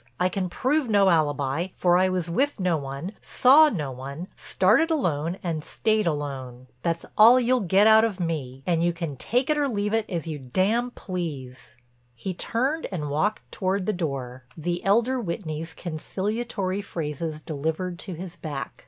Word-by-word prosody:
I 180 +1 +3
can 185 -1 -2
prove 260 - 0
no 200 -2 +5
alibi, 145 0 +1
for 175 -1 +3
I 185 +1 +4
was 180 -2 -1
with 265 +10 0
no 180 -3 +2
one, 140 +4 -5
saw 295 +5 +6
no 150 - -3
one, 140 +7 -7
started 215 - +2
alone 175 - 0
and 165 -4 -2
stayed 215 +1 0
alone. 135 -5 -4 0.2
That's 165 +3 -1
all 235 +4 +9
you'll 255 +1 +2
get 195 0 +3
out 220 0 +7
of 215 -4 -1
me, 140 -6 -3
and 170 -2 +1
you 175 0 +2
can 165 -4 -4
take 250 - 0
it 300 - +1
or 285 - +2
leave 210 -4 -1
it 225 -1 0
as 170 -3 -3
you 155 -3 -4
d——n 195 - +1
please." 145 -9 -6 0.4
He 185 +11 -4
turned 260 - -1
and 150 -6 -3
walked 195 +9 -1
toward 190 0 -1
the 215 - 0
door, 130 -7 -4
the 175 +2 -2
elder 235 +6 +2
Whitney's 165 -5 -4
conciliatory 195 +4 -3
phrases 155 -4 -4
delivered 160 +4 -3
to 190 - -6
his 175 +1 -7
back. 145 -5 -6
180 Hz, 170 wpm, -25 LUFS, 155-215 Hz, 0.4 s, all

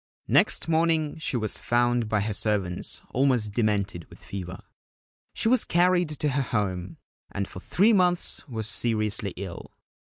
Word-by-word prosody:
Next - - +2
morning 160 -1 +1
she 140 - -1
was 110 -2 -1
found 120 -1 +1
by 105 -1 +1
her 105 +1 -2
servants 100 -4 -1
almost 125 -5 +2
demented 100 -5 -1
with - - -14
fever. 90 -2 -7 0.7
She - - 0
was 250 0 +4
carried 175 -1 +2
to 150 0 -1
her 140 0 0
home, 95 -7 -2 0.3
and 100 -1 -3
for - - -9
three 205 - +3
months 180 -4 +1
was 110 -3 -4
seriously 110 -4 0
ill. 95 -3 -7
115 Hz, 150 wpm, -26 LUFS, 100-155 Hz, 0.7 s, was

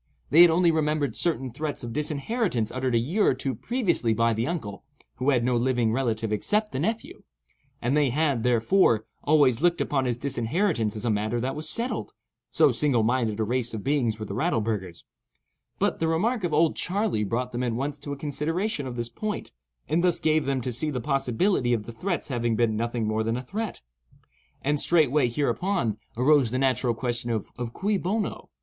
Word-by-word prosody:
They 160 +5 +8
had 175 - +9
only 170 +1 +4
remembered 150 -5 0
certain 135 -7 -1
threats 145 +3 -4
of 115 -1 -5
disinheritance 150 - -1
uttered 130 -1 -1
a - - +5
year 165 - +1
or - - +4
two 135 0 -3
previously 175 - 0
by 115 +1 +2
the 115 +3 -1
uncle 110 - -4 0.3
(who 130 +2 0
had 125 -4 +3
no 125 0 +1
living 120 -2 +1
relative 115 -4 -1
except 210 - 0
the - - -3
nephew), 220 +9 -3 0.6
and 125 +4 +1
they 145 -2 +3
had, 140 -2 +1
therefore, 120 - +3 0.2
always 145 -5 +3
looked 175 0 +3
upon 135 -2 0
this 120 -2 -1
disinheritance 130 - 0
as 110 - -5
a 115 - +2
matter 110 +3 -1
that 130 +3 -2
was 155 +1 -1
settled—so 235 +7 -1
single 135 -7 +2
minded 115 -2 0
a - - +2
race 120 +1 -1
of 105 - -6
beings 130 -6 +1
were 110 - -5
the - - -6
Rattleburghers; 110 - -2 0.7
but - - 0
the 160 - +1
remark 210 +8 0
of 175 - 0
"Old 155 +2 +3
Charley" 195 - 0
brought 120 +5 -2
them 120 - -3
at 120 -2 -1
once 140 +4 -3
to 145 - -7
a 140 - -4
consideration 150 +3 -2
of 125 - -6
this 120 -1 -2
point, 215 - -5 0.4
and 165 +3 +1
thus 180 -2 +3
gave 155 -1 +2
them 135 -1 0
to 125 - -3
see 130 +6 +1
the 135 -4 -2
possibility 135 - +1
of 110 -3 -1
the 115 - -8
threats 175 +10 -3
having 120 -3 0
been 115 -1 +1
nothing 115 0 -2
more 110 +1 0
than 115 +2 -1
a 125 - -5
threat. 210 - -5 0.8
And 145 +1 +1
straightway 150 -6 +3
hereupon, 140 - -1 0.2
arose 135 -1 +4
the 125 - -2
natural 130 -2 +1
question 120 0 -2
of 110 -3 -3 0.2
cui 200 +1 0
bono? 205 +5 -3
130 Hz, 195 wpm, -26 LUFS, 115-160 Hz, 0.8 s, had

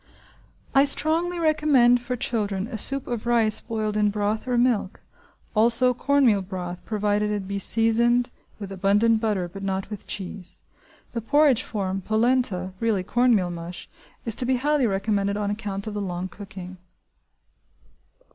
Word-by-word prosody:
I 275 - +5
strongly 330 +5 +2
recommend 295 -7 +3
for 245 +1 -4
children 210 -5 -2
a 235 0 -7
soup 275 +4 +5
of 240 -1 -5
rice 230 -3 +3
boiled 215 -2 -3
in 210 -1 +2
broth 210 +3 -2
or 250 -1 0
milk; 235 -5 0 0.6
also 235 +3 +4
cornmeal 255 -5 +2
broth, 180 -2 -7
provided 210 -1 0
it 205 -2 -3
be 200 0 -3
seasoned 235 +4 +1 0.3
with 200 -2 -8
abundant 205 +4 +2
butter, 205 -6 -1
but 195 +3 -10
not 195 +1 -3
with 210 - -8
cheese. 190 -2 -6 0.5
(The 230 - -4
porridge 285 +1 +3
form–polenta, 205 0 -1
really 220 -5 0
cornmeal 225 -5 +2
mush, 170 +1 -8 0.4
is 230 - +1
to 250 - +3
be 260 - +2
highly 285 0 +1
recommended 200 0 -1
on 205 -1 -2
account 205 -2 -4
of 215 - -5
the 205 - -3
long 180 -1 -4
cooking.) 185 -1 -10
215 Hz, 145 wpm, -24 LUFS, 195-245 Hz, 0.6 s, I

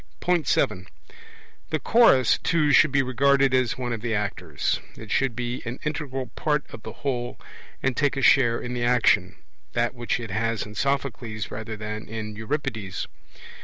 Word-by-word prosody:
(7) 95 -8 +1 0.8
The 155 - 0
Chorus 150 - +5
too 150 -3 +2
should 145 +1 +6
be 135 0 +3
regarded 135 +1 +3
as 130 -2 +2
one 125 -2 -2
of 115 - -4
the 115 -1 -1
actors; 105 0 -2 0.2
it - - -9
should 135 -4 +1
be 120 +1 -3
an 120 +2 -5
integral 140 -4 -3
part 150 -2 0
of 110 - -9
the 110 - -7
whole, 120 -3 -2 0.4
and 135 -2 +1
take 145 -1 +1
a 135 - -1
share 120 -3 +5
in 120 - -5
the 120 -1 -2
action 110 -6 +3 0.4
that 120 0 +1
which 120 -1 -2
it 115 -5 -6
has 115 +2 -1
in 105 - -10
Sophocles 120 -4 -2
rather 110 0 -5
than 105 +1 -5
in 105 -1 -5
Euripides. 110 - -3
120 Hz, 165 wpm, -25 LUFS, 110-135 Hz, 0.8 s, should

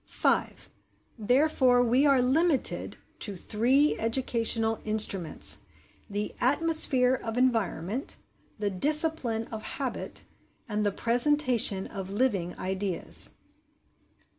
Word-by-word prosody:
5. - - -2 0.5
Therefore 250 +1 +3
we 250 +5 +2
are 270 -3 +3
limited 290 +3 0 0.2
to 205 - -6
three 245 - +1
educational 225 -1 0
instruments 205 -6 +1 0.5
the 205 +1 -4
atmosphere 270 -2 +3
of 230 -2 -4
environment, 225 - -1 0.4
the 205 -2 -2
discipline 280 - 0
of 220 -1 -6
habit, 265 +2 -4 0.4
and 210 -2 -2
the 205 - +1
presentation 240 -4 +2
of 195 -2 -7
living 200 -5 -1
ideas. 190 -1 -1
235 Hz, 95 wpm, -27 LUFS, 210-265 Hz, 0.5 s, Therefore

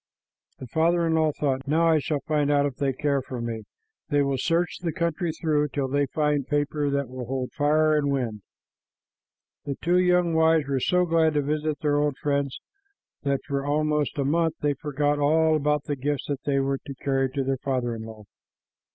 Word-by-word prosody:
The - - -8
father 165 +6 +2
in 165 - +1
law 160 -1 +3
thought, 135 -2 -2
"Now 165 +3 +3
I 160 -1 +4
shall 150 -1 -2
find 150 -3 0
out. 145 -1 +3
If 140 -3 -3
they 140 -1 +1
care 140 +1 0
for 130 -1 -7
me, 115 -2 -4 0.4
they 145 -2 +3
will 140 -1 -1
search 170 +3 0
the 170 -2 -2
country 170 0 -1
through 155 -2 0
till 140 -1 -2
they 140 +1 +1
find 150 -2 0
paper 145 0 0
that 140 -1 -1
will 130 0 -7
hold 130 0 -3
fire 155 +1 +2
and 145 -1 +1
wind." 120 -6 -2 1.2
The 140 - -3
two 175 +2 +2
young 180 -2 +3
wives 160 -2 +3
were 135 -1 0
so 180 +7 +2
glad 165 -2 +2
to 145 - +2
visit 150 +1 -2
their 145 -2 +2
old 145 -2 0
friends 140 -2 -1 0.6
that 140 -1 0
for 140 -1 -2
almost 150 +1 0
a 140 - 0
month 160 +2 +1
they 145 -1 +2
forgot 145 0 -1
all 160 +2 +3
about 150 -1 +1
the 145 - -2
gifts 140 +1 -2
that 140 -2 -3
they 140 -1 +1
were 135 0 0
to 140 - -9
carry 135 0 0
to 140 - -1
their 135 0 -1
father 130 -3 -1
in 115 - -6
law. 110 -1 -10
145 Hz, 205 wpm, -25 LUFS, 135-155 Hz, 1.2 s, I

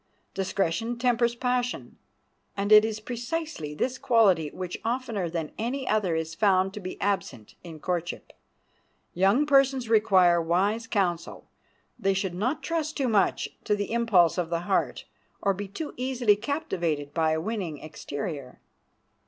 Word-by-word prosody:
Discretion 195 +4 -1
tempers 240 -1 +2
passion, 250 0 -2 0.6
and 200 +1 -1
it 210 0 +9
is 220 -1 -2
precisely 240 - -4
this 255 +10 -2
quality 195 - +3
which 180 +3 -6
oftener 230 -6 -2
than 165 -2 -4
any 255 +4 -2
other 200 -6 +1
is 160 0 -3
found 190 0 +2
to 210 - -6
be 185 -2 -7
absent 140 - -2
in 165 -3 -9
courtship. 175 +1 -4 0.8
Young 195 - +3
persons 270 -4 +3
require 190 -6 +5
wise 195 +7 0
counselors. 175 -5 -1 0.6
They 195 -3 +1
should 190 -2 -1
not 235 - -2
trust 320 -2 -2
too 270 -4 +1
much 205 -4 +2
to 210 - +1
the 205 +1 -3
impulse 200 -8 +3
of 170 -2 -1
the 170 0 -1
heart, 175 - -1 0.4
nor 200 - +4
be 200 +1 -5
too 295 - -6
easily 250 -4 +2
captivated 180 - -2
by 160 -1 +2
a 160 - 0
winning 185 -4 -3
exterior. 145 -2 -6
200 Hz, 145 wpm, -27 LUFS, 175-240 Hz, 0.8 s, it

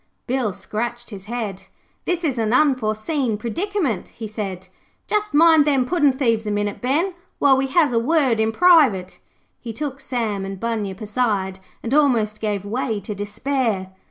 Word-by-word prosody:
Bill 245 -4 0
scratched 235 +5 -5
his 195 -2 -9
head. 215 -5 -5 0.4
'This 355 -1 -1
is 275 -6 0
an 220 0 +1
unforeseen 255 -2 +1
predicament,' 310 - -2
he 225 -2 -8
said. 195 -4 -5 0.4
'Just 425 0 -1
mind 320 0 +7
them 275 -4 +2
puddin' 295 -1 +3
thieves 230 -5 0
a - - 0
minute, 205 0 -2
Ben, 315 +9 +1 0.2
while 280 -2 +5
we 270 +1 0
has 290 -1 +3
a 230 - +3
word 265 -3 +2
in 220 0 +2
private.' 275 - +4 0.4
He 235 - -6
took 275 +3 -5
Sam 225 -7 -2
and 195 0 -6
Bunyip 215 -4 -3
aside, 205 -4 -1 0.2
and 235 - -2
almost 235 -8 +2
gave 205 -2 -2
way 225 0 -2
to 210 +2 -6
despair. 205 -1 -2
235 Hz, 160 wpm, -21 LUFS, 210-280 Hz, 0.4 s, mind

